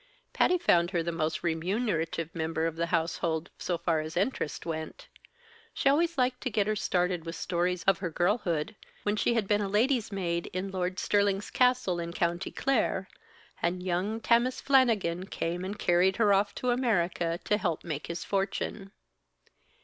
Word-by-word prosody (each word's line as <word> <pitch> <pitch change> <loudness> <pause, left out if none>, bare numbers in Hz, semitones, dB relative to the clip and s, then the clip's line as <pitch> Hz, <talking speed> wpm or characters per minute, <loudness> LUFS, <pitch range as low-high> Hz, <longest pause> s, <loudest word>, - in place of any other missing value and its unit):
Patty 360 - +3
found 175 - +3
her 175 -3 0
the 170 - -2
most 160 -1 -2
remunerative 165 -1 -1
member 160 0 -1
of 165 -1 -1
the 170 +1 -1
household, 165 -1 -1
so 175 - -1
far 165 -1 0
as 155 +2 -5
interest 195 - -1
went. 160 -1 -5 0.7
She - - 0
always 330 +3 +2
liked 250 -1 +1
to 260 - -1
get 210 -3 +1
her 215 +1 0
started 180 -4 0
with 165 +1 -6
stories 180 0 -1
of 195 -1 +3
her 185 -3 -2
girlhood, 175 +1 0 0.3
when 205 0 +1
she 235 +2 +1
had 220 -4 0
been 210 0 +2
a 200 - -2
lady's 230 +2 +2
maid 170 -3 -2
in 185 +2 -3
Lord 185 -1 -2
Stirling's 200 -1 +1
castle 250 -8 +2
in 170 0 -4
County 175 +2 -1
Clare, 220 -7 0 0.5
and 180 +1 -1
young 185 +5 -1
Tammas 235 +3 +2
Flannigan 215 -10 +2
came 175 0 -3
and 200 +2 -4
carried 180 +1 +3
her 210 -3 +4
off 200 +1 +1
to 250 - 0
America 175 -8 0
to 210 - +2
help 170 -7 -2
make 155 -3 -4
his 170 - -4
fortune. 195 0 -2
185 Hz, 170 wpm, -29 LUFS, 170-210 Hz, 0.7 s, her